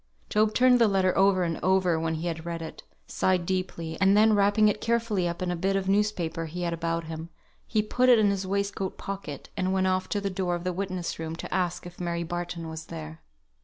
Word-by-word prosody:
Job 215 0 +3
turned 250 0 +5
the 230 - +6
letter 190 -2 +2
over 195 -1 +4
and 165 -2 -2
over 185 -3 +2
when 160 0 -1
he 160 +2 -4
had 165 -2 -3
read 170 0 -4
it; 160 - -8 0.2
sighed 185 -2 0
deeply; 170 -3 -3
and 195 +1 +5
then 215 +1 +6
wrapping 205 +1 +4
it 210 0 0
carefully 230 -6 0
up 170 +1 -3
in 180 - -1
a - - -1
bit 190 +3 0
of 195 -1 -1
newspaper 190 -5 0
he 175 +3 -5
had 170 -1 -1
about 165 0 -2
him, 160 +1 -7 0.4
he 215 -2 +1
put 250 +4 +2
it 245 - +8
in 210 -2 +4
his 195 -1 -2
waistcoat 200 -1 -2
pocket, 195 -8 -6
and 185 0 0
went 190 0 +2
off 185 0 0
to 205 - 0
the 200 -1 -2
door 185 -1 -1
of 175 - -5
the 180 0 -1
witness 185 -3 -3
room 160 0 -4
to - - -6
ask 180 -2 -1
if 175 0 -11
Mary 170 -1 -2
Barton 175 0 -4
were 160 0 -6
there. 160 -1 -8
185 Hz, 235 wpm, -27 LUFS, 170-200 Hz, 0.4 s, it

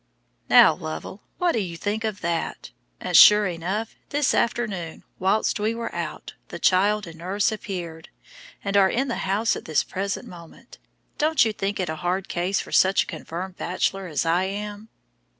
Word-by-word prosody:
Now, - - +8
Lovell, 80 - -7 0.2
what 355 -1 +2
do 230 - 0
you 175 -5 -4
think 210 +5 -2
of 215 -2 -3
that? 170 -1 -3 0.3
And - - -3
sure 210 0 +9
enough, 190 +5 -3 0.2
this 290 -1 +1
afternoon, 205 -9 -2 0.2
while 195 +4 +2
we 215 +2 0
were 230 0 -5
out, - - -5
the - - -7
child 205 +3 +2
and 165 -1 -11
nurse 195 +5 0
appeared, 175 -6 -6 0.5
and 200 0 -2
are 195 -1 +5
in 265 +6 -1
the 235 - -1
house 215 +4 +1
at - - -8
this 155 -3 +1
present 195 +1 -4
moment. 170 -2 -14 0.4
Don't 305 -4 +3
you 220 - -1
think 200 0 -3
it 185 - -1
a 160 0 -4
hard 180 +3 -2
case 180 +2 0
for - - -7
such 190 +1 +4
a - - -14
confirmed 175 +3 -7
bachelor 190 +1 -2
as 155 -1 -1
I 170 +3 +2
am?" 205 +2 -6
195 Hz, 180 wpm, -24 LUFS, 175-210 Hz, 0.5 s, sure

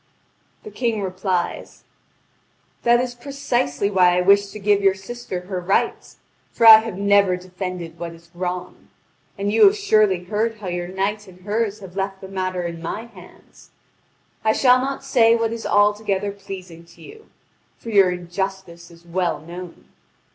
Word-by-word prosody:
The 430 - -10
King 230 - -2
replies: 185 -1 -3 1.0
"That 240 0 +4
is 250 0 -2
precisely 240 - -2
why 180 -2 +4
I - - +3
wish 200 +2 +4
to 200 - -10
give 205 0 +2
your 195 -1 +3
sister 195 -1 -7
her 185 0 -5
rights; 195 +3 -1 0.3
for 230 - +1
I 220 -1 +12
have 220 -4 -6
never 200 -2 +3
defended 180 -2 -7
what 170 -1 -6
is 170 +1 -18
wrong. 180 0 -5 0.5
And 200 +1 -1
you 225 - +4
have 400 +2 +2
surely 215 - +2
heard 220 +4 -2
how 200 -3 -6
your 175 0 -3
knight 200 +3 -3
and 185 -1 -16
hers 210 +1 -2
have 190 -2 -11
left 195 0 -3
the 190 - -9
matter 185 -1 -3
in 170 -1 -5
my 210 +7 -5
hands. 235 - -17 0.7
I 220 0 +3
shall 250 0 +4
not 270 +1 -4
say 235 -4 +4
what 230 -1 -1
is 230 - -5
altogether 205 -1 +1
pleasing 190 -4 -10
to 170 0 -19
you; 440 0 -14 0.5
for 230 - -8
your 195 -3 +5
injustice 180 -1 -5
is 170 0 -18
well 175 0 -1
known. 175 +2 -10
195 Hz, 165 wpm, -21 LUFS, 180-220 Hz, 1.0 s, I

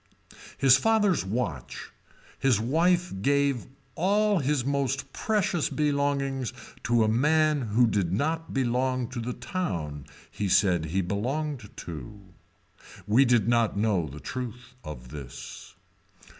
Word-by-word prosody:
His 135 -1 +6
father's 210 -1 +2
watch, 95 - -4 0.5
his 130 -6 +3
wife 170 +9 +2
gave 140 0 +1 0.3
all 205 +5 +2
his 140 -3 0
most 135 -1 -1
precious 200 -7 0
belongings 140 -3 0 0.3
to 120 -1 +3
a - - +2
man 150 +6 +3
who 115 +4 +4
did 100 -6 0
not 160 - -1
belong 130 -1 0
to 130 - -5
the 120 +2 -3
town 75 - -4 0.2
he 100 -2 -2
said 90 -4 +3
he 90 +5 0
belonged 120 - -3
to. 80 - -8 0.9
We 120 +6 +4
did 120 -4 +3
not 115 -3 +2
know 100 -6 +1
the 70 +2 -9
truth 125 - -6
of 60 -5 -8
this. 70 -2 -9
125 Hz, 125 wpm, -27 LUFS, 100-145 Hz, 0.9 s, His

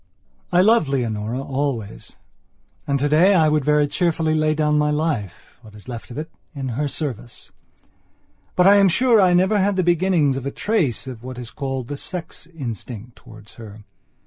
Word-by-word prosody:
I 180 0 +4
loved 215 -5 +4
Leonora 120 -3 -2
always 135 -6 -4 0.7
and, 140 - +1
today, 155 +8 +4
I 160 -3 +4
would 150 -1 +1
very 150 +1 +3
cheerfully 160 +1 0
lay 155 0 +1
down 150 -1 +1
my 150 0 +2
life, 150 - -3
what 110 -3 -15
is 105 - -14
left 120 -3 -7
of 120 - -9
it, 155 +2 -6 0.2
in 135 -2 -4
her 140 +5 -2
service. 130 -5 -6 1.0
But 180 - +3
I 200 +1 +7
am 195 -1 +5
sure 235 +3 +4
I 180 -2 +4
never 190 +4 +3
had 200 +1 +1
the 185 - +1
beginnings 170 -5 +2
of 135 - -6
a - - 0
trace 160 - -1
of 125 -4 -8
what 130 0 -8
is 120 -2 -8
called 135 -3 -4
the 145 - -5
sex 165 -1 -8
instinct 120 - -8
towards 110 -4 -15
her. 105 -1 -11
145 Hz, 180 wpm, -21 LUFS, 125-170 Hz, 1.0 s, I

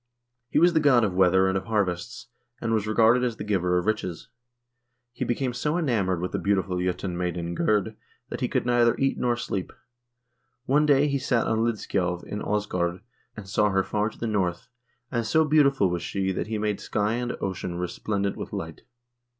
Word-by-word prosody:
He - - -1
was 175 0 +5
the 160 - +4
god 135 -6 +4
of 100 -4 0
weather 95 +1 +4
and 95 - 0
of 95 0 -2
harvests, 95 -6 -2 0.3
and 115 - -1
was 110 -1 0
regarded 115 +3 +4
as 120 -3 -1
the - - -5
giver 90 -4 +1
of 90 - -1
riches. 110 -6 -2 0.8
He - - -3
became 125 +1 -1
so 150 +6 -1
enamoured 105 - 0
with 90 - -3
the - - -2
beautiful 95 -2 0
J0tun 90 0 -2
maiden 85 -1 -3
Gerd 105 +4 0 0.3
that - - -6
he - - +1
could - - -1
neither 120 -1 +3
eat 135 0 0
nor 120 -1 +1
sleep. 100 -5 -4 0.9
One 150 +3 +3
day 145 0 +4
he 140 -1 0
sat 125 -3 +1
on 110 - 0
Lidskjalv 95 -6 -1
in 105 - -5
Aasgaard 90 -4 -1 0.4
and 105 -3 -8
saw 105 +1 +2
her 95 -1 +2
far 105 +2 -1
to - - -17
the - - -4
north, 95 -6 -1 0.4
and 120 -2 0
so 160 +8 +3
beautiful 140 - +3
was 90 -1 -2
she 95 +1 -2
that 95 - -3
she 110 0 -2
made 105 -1 -1
sky 105 +1 -1
and 120 +1 -3
ocean 95 -2 -3
resplendent 100 +3 -2
with - - -6
light. 80 -1 -5
105 Hz, 195 wpm, -26 LUFS, 90-120 Hz, 0.9 s, was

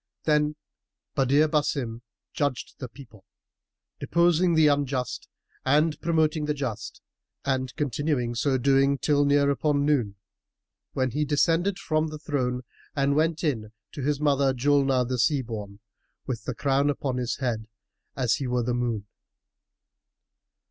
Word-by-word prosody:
Then 150 -1 +2 0.6
Badr 140 +3 +3
Basim 140 -6 -1 0.3
judged 140 -4 -2
the 130 - -6
people, 115 -5 -15 0.8
deposing 170 0 +3
the 160 -1 +5
unjust 140 -4 0 0.3
and 150 +3 +2
promoting 160 -2 +1
the 150 0 -1
just 115 -6 -5 0.4
and 130 -2 -1
continued 140 -3 -1
so 130 +2 +1
doing 135 +2 +3
till 145 0 +2
near 140 0 +3
upon 145 0 +1
noon, 125 -9 +1 0.8
when 130 -1 0
he 150 +5 0
descended 165 +6 +2
from 155 -4 0
the 155 0 -6
throne 130 -5 -2 0.3
and 140 0 +2
went 160 +2 +1
in 110 -8 -1 0.2
to 145 - -7
his 145 +1 0
mother, 140 -3 +2
Julnar 135 -1 +2
the 125 0 -2
Sea 140 +2 +2
born, 105 -4 -7 0.5
with 120 -5 -4
the 125 - -3
crown 140 +1 +1
upon 135 -2 -2
his 125 -1 -1
head, 115 -4 -2 0.5
as 125 -4 +1
he 135 - -3
were 125 -1 0
the 120 +1 -1
moon. 120 -4 -1
140 Hz, 140 wpm, -26 LUFS, 125-150 Hz, 0.8 s, the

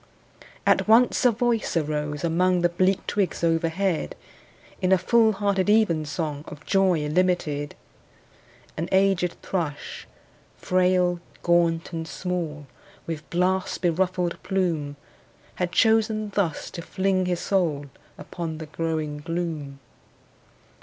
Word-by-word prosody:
At - - +3
once 235 +3 +4
a 245 - +7
voice 235 -4 0
arose 150 -1 -2
among 180 +2 +2
The 175 - +3
bleak 185 +2 +1
twigs 195 -5 -1
overhead, 165 - 0 0.7
In 185 - +1
a 190 - +6
full 220 +4 +3
hearted 200 -1 0
evensong 155 -7 +1
Of 150 0 -10
joy 190 -5 +3
illimited. 150 -3 0 1.0
An 165 +2 -3
aged 190 -2 +2
thrush, 160 -6 -4 0.5
frail, 180 -1 +2 0.2
gaunt 170 -1 +2
and 165 -1 -4
small, 165 -6 -4 0.4
With 160 -2 -6
blast 185 +2 0
beruffled 180 0 0
plume, 165 -7 -1 0.7
Had 175 -1 0
chosen 220 -1 +2
thus 190 -6 -1
to 170 - -6
fling 190 +1 0
his 175 -1 0
soul 165 -7 0 0.3
Upon 165 -3 -6
the 160 - -6
growing 155 -1 -3
gloom. 160 -3 -4
175 Hz, 115 wpm, -25 LUFS, 160-190 Hz, 1.0 s, a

